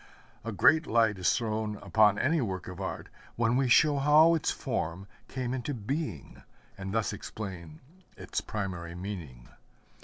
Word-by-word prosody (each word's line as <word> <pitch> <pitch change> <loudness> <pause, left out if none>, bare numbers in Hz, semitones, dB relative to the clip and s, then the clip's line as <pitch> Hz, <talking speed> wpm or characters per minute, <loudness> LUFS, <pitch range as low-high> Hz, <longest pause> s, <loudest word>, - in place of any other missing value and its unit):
A 115 - -4
great 155 - +4
light 110 -4 +2
is 90 - +2
thrown 110 -2 -2
upon 105 -1 +3
any 155 +7 +2
work 95 -6 -3
of 90 +1 -7
art 95 - -5 0.3
when 115 +1 +1
we 130 -1 +2
show 145 +3 +5
how 150 +4 +6
its 165 - 0
form 85 +4 -3 0.2
came 125 -1 -3
into 130 +2 -3
being, 125 - -5 0.3
and 95 0 -6
thus 110 0 0
explain 95 -6 -8 0.4
its - - -3
primary 90 -5 -5
meaning. 85 -11 -7
110 Hz, 150 wpm, -29 LUFS, 95-130 Hz, 0.4 s, how